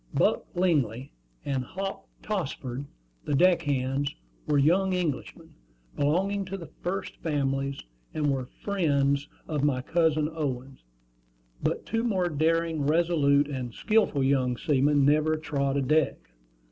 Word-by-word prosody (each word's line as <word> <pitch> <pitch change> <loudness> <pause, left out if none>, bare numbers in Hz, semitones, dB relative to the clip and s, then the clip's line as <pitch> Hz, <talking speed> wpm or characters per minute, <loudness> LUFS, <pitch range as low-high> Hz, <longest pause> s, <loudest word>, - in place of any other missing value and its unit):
Buck - - +2
Lingley 140 - +1 0.3
and 135 -2 -1
Hop 195 +8 -5 0.2
Tossford, 140 - -3 0.4
the 145 - 0
deck 175 +3 +5
hands, 140 -1 -1 0.3
were 145 - +2
young 185 +6 +3
Englishmen, 165 -7 -3 0.4
belonging 190 +8 +1
to 195 +1 -5
the 170 -4 -10
"first 185 +1 -3
families," 140 -3 -1 0.3
and 150 -2 0
were 130 -2 -3 0.2
friends 145 -7 +1 0.2
of 150 -3 -1
my 130 -3 +1
cousin 160 -2 +2
Owen; 135 -4 -4 0.8
but - - -1
two 225 0 -1
more 190 -7 +1
daring, 165 +1 +1
resolute, 150 -3 +3
and 130 -5 -5
skilful 215 -11 +2
young 130 -2 +2
seamen 145 -1 +3
never 155 +2 +3
trod 140 -3 -1
a 140 - +1
deck. 155 +3 +2
150 Hz, 130 wpm, -27 LUFS, 140-170 Hz, 0.8 s, deck